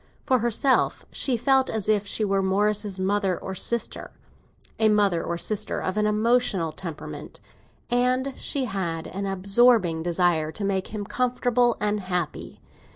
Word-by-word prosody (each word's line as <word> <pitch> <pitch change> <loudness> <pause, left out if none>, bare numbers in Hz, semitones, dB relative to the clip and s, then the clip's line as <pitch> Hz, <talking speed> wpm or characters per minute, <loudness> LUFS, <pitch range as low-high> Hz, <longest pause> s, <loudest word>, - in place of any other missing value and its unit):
For 260 -3 +3
herself, 240 +3 +1
she 255 -4 0
felt 265 +2 +2
as 215 -3 -2
if 210 -1 +1
she 215 - 0
were 195 -1 +1
Morris's 205 +1 0
mother 195 -1 0
or 190 - -6
sister—a 220 +1 -4
mother 200 -5 +2
or 170 - -3
sister 210 +4 -2
of 185 - -3
an 210 0 +1
emotional 210 -5 +1
temperament—and 245 - -4
she 275 -2 -2
had 175 -6 -3
an 195 +1 -4
absorbing 195 -2 +3
desire 170 -2 +1
to 205 - -4
make 190 -1 -1
him 210 -2 -5
comfortable 245 0 +1
and 210 0 0
happy. 180 -4 -4
205 Hz, 140 wpm, -25 LUFS, 185-235 Hz, -, For